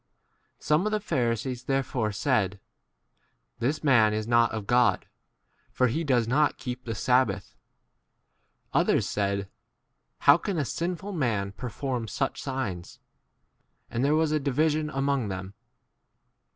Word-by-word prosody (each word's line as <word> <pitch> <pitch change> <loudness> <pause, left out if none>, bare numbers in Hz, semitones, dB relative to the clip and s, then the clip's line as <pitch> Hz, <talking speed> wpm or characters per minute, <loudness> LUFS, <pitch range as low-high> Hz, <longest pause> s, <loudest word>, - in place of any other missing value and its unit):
Some 155 +7 +1
of - - -1
the 215 - +1
Pharisees 125 - -2
therefore 130 -5 0
said, 100 -4 0 1.0
This 145 +6 -1
man 115 -7 +4
is 110 0 -3
not 120 -1 +4
of 110 -2 -4
God, 120 +2 +3 0.6
for 130 - +1
he 160 +8 -1
does 125 -6 +2
not 145 +5 +2
keep 125 0 -6
the 115 -2 -3
sabbath. 125 0 +1 1.2
Others - - +2
said, 100 -1 -1 0.7
How 145 +4 +7
can 195 0 -3
a 150 - 0
sinful 180 +7 -3
man 115 - -1
perform 125 +2 -4
such 105 - -2
signs? 120 -11 -4 0.9
And 120 - -1
there 145 +2 +3
was 160 -1 +2
a 155 - +2
division 150 +2 +1
J - - -7
7 - - -5
among 135 -4 +1
them. 95 0 -5
125 Hz, 140 wpm, -27 LUFS, 110-145 Hz, 1.2 s, How